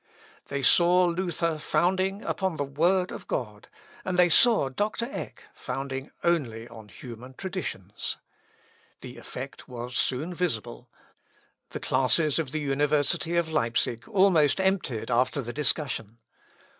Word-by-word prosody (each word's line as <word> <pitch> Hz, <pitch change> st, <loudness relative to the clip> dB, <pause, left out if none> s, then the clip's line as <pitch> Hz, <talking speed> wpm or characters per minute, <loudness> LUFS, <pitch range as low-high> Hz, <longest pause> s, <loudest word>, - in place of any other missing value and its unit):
They 140 Hz, -1 st, -3 dB
saw 175 Hz, +5 st, +5 dB
Luther 170 Hz, -2 st, -1 dB
founding 190 Hz, +5 st, +1 dB
upon 190 Hz, -4 st, -1 dB
the 145 Hz, -, 0 dB
word 175 Hz, +7 st, +1 dB
of -, -, -8 dB
God, 105 Hz, -3 st, -4 dB, 0.4 s
and 185 Hz, -1 st, -2 dB
they 180 Hz, -1 st, +6 dB
saw 225 Hz, -, +5 dB
Dr. 210 Hz, -, -1 dB
Eck -, -, -7 dB
founding 135 Hz, 0 st, -5 dB
only 120 Hz, -10 st, 0 dB
on 110 Hz, -3 st, -12 dB
human 125 Hz, +4 st, -10 dB
traditions. 175 Hz, -, -5 dB, 0.8 s
The -, -, -9 dB
effect -, -, -8 dB
was 125 Hz, 0 st, -6 dB
soon 150 Hz, +8 st, -1 dB
visible. 120 Hz, -8 st, -3 dB, 0.8 s
The -, -, -5 dB
classes 150 Hz, +4 st, +2 dB
of 150 Hz, -5 st, -2 dB
the 155 Hz, 0 st, -2 dB
university 145 Hz, +4 st, +1 dB
of 170 Hz, -2 st, +1 dB
Leipsic 115 Hz, -4 st, 0 dB
almost 190 Hz, -8 st, +4 dB
emptied 190 Hz, -, 0 dB
after 125 Hz, +4 st, +2 dB
the 120 Hz, -2 st, -4 dB
discussion. 130 Hz, -7 st, -1 dB
150 Hz, 130 wpm, -27 LUFS, 125-180 Hz, 0.8 s, they